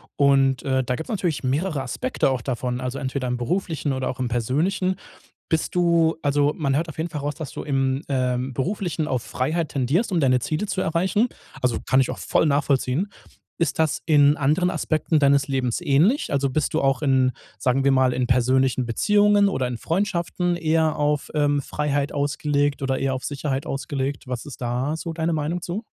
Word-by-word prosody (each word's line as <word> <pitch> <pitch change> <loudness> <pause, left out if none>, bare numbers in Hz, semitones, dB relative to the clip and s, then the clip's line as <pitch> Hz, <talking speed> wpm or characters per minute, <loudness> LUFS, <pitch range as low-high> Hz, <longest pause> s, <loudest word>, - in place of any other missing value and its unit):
und, 135 -2 +3
äh, 130 -1 +1
da 125 - -1
gibt's 160 - -7
natürlich 180 -10 -1
mehrere 145 +3 0
Aspekte 255 - -1
auch 130 - -1
davon, 125 0 -3
also 125 +1 -4
entweder 130 -1 -3
im 125 - -1
Beruflichen 160 +3 -2
oder 130 -1 -2
auch 130 - -5
im 125 - -1
Persönlichen. 155 - 0 0.5
Bist 160 +2 -1
du 170 -2 +3
also 145 0 +2
man 140 -4 0
hört 165 +4 0
auf 155 - -10
jeden 160 +2 -2
Fall 150 -3 -5
raus, 145 0 -3
dass 155 -5 -6
du - - -6
im, 135 -1 0
ähm, 125 -1 -1
Beruflichen 170 - -2
auf 130 -3 0
Freiheit 155 +7 -2
tendierst, 150 - 0
um 175 - +2
deine 130 -2 +3
Ziele 155 - -2
zu 190 - -3
erreichen. 185 +8 +1 0.3
Also 125 -2 +1
kann 130 - +3
ich 130 - +2
auch - - -4
voll - - +1
nachvollziehen. 140 +3 +1 0.5
Ist 165 -3 -1
das 160 -2 +1
in 145 -2 +5
anderen 155 +5 +2
Aspekten 155 -2 0
deines 140 -1 +3
Lebens 130 -4 -1
ähnlich? 160 - +2
Also 140 -1 +1
bist 155 +4 -1
du 160 - +1
auch 135 0 +1
in, 130 -3 +3 0.3
sagen 130 +5 +1
wir 140 - +5
mal, 130 -1 +3
in 125 0 -1
persönlichen 130 +1 +2
Beziehungen 205 - +3
oder 135 -10 -1
in 125 -1 -4
Freundschaften 175 - -1
eher 160 -1 +1
auf, 150 -1 0
ähm, 145 -1 +2
Freiheit 145 0 -1
ausgelegt 145 0 0
oder 135 -1 0
eher 135 -1 0
auf 130 - -4
Sicherheit 140 -1 -3
ausgelegt? 135 0 -3
Was 125 -2 -4
ist 145 - -9
da 125 +6 -1
so 165 0 -5
deine 160 0 -1
Meinung 160 +3 -1
zu? 185 +7 -4
145 Hz, 195 wpm, -23 LUFS, 130-160 Hz, 0.5 s, in